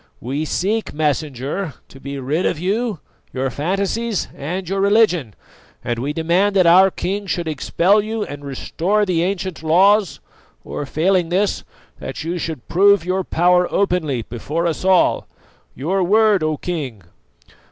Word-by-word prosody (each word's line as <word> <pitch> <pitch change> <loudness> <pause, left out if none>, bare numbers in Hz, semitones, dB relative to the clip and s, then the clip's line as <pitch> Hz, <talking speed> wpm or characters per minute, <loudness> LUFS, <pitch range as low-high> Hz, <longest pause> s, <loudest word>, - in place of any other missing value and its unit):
"We 140 +6 -3
seek, 210 +6 -1
Messenger, 150 +1 -2
to 135 - -14
be 140 +1 -6
rid 145 +7 -1
of - - -1
you, 200 +3 -1 0.3
your 130 0 -2
fantasies 195 - -2
and 175 +6 -4
your 195 +2 -1
religion; 195 - +2 0.5
and 120 -1 -2
we 140 +4 -2
demand 175 +6 +1
that 185 -2 +4
our 185 +3 +7
king 200 +2 -4
should 175 -2 -2
expel 170 +7 +2
you 220 +1 -3
and 145 -4 -8
restore 175 +9 -1
the 175 -4 0
ancient 185 -1 -2
laws, 185 0 +3 0.4
or 145 - -5
failing 175 +3 +1
this, 195 +3 0 0.4
that - - -6
you 170 +2 -3
should 160 -7 -5
prove 200 +1 +4
your 185 +1 0
power 180 +1 +2
openly 160 - 0
before 145 +10 -4
us 165 -1 -2
all. 185 -1 +3 0.5
Your 180 +9 -1
word, 210 +1 +3
O 155 -1 0
King!" 140 - -5
175 Hz, 150 wpm, -20 LUFS, 150-195 Hz, 0.5 s, our